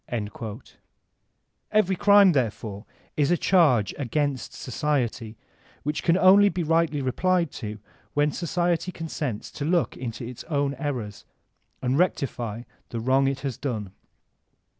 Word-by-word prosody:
Every 195 -3 +3
crime, 200 0 +6
therefore, 110 - -2 0.3
is 145 -2 +2
a 175 - +3
charge 145 - +3
against 140 -1 -1
society 120 -5 -2 0.5
which 150 +1 -2
can 170 +1 +3
only 195 +2 +7
be 180 -3 -2
rightly 160 -3 +1
replied 170 +5 +1
to 105 -2 -5 0.4
when 145 +1 +3
society 175 +1 -1
con 165 -2 -7
sents 130 -11 -4
to 145 - -6
look 170 +2 +1
into 120 -1 -6
its 125 0 -8
own 140 -3 0
errors 125 -9 -4 0.6
and 130 +4 +1
rectify 120 - -1 0.3
the 115 - -4
wrong 130 +3 +2
it 135 0 -2
has 135 -4 -3
done. 110 -8 -4
145 Hz, 130 wpm, -25 LUFS, 120-170 Hz, 0.6 s, only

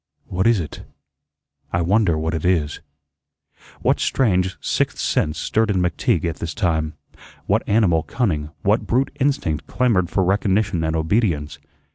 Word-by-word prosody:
What 95 +4 0
is 115 -3 +4
it? 80 - -6 0.9
I 85 0 +1
wonder 95 -2 +2
what 80 +1 -2
it 80 - -3
is." 85 -5 +1 1.0
What - - +2
strange 95 -7 +1
sixth - - -1
sense 75 0 0
stirred 110 +5 0
in 100 - +1
McTeague 90 -1 +1
at 80 -2 -2
this 85 -1 -5
time? 80 -6 0 0.5
What - - +2
animal 100 -7 +3
cunning, 80 - -1
what 105 +3 +2
brute 130 +4 0
instinct 135 - 0
clamored 105 -9 +1
for 95 - +1
recognition 95 -1 +1
and 80 0 0
obedience? 80 -3 0
90 Hz, 145 wpm, -21 LUFS, 80-105 Hz, 1.0 s, is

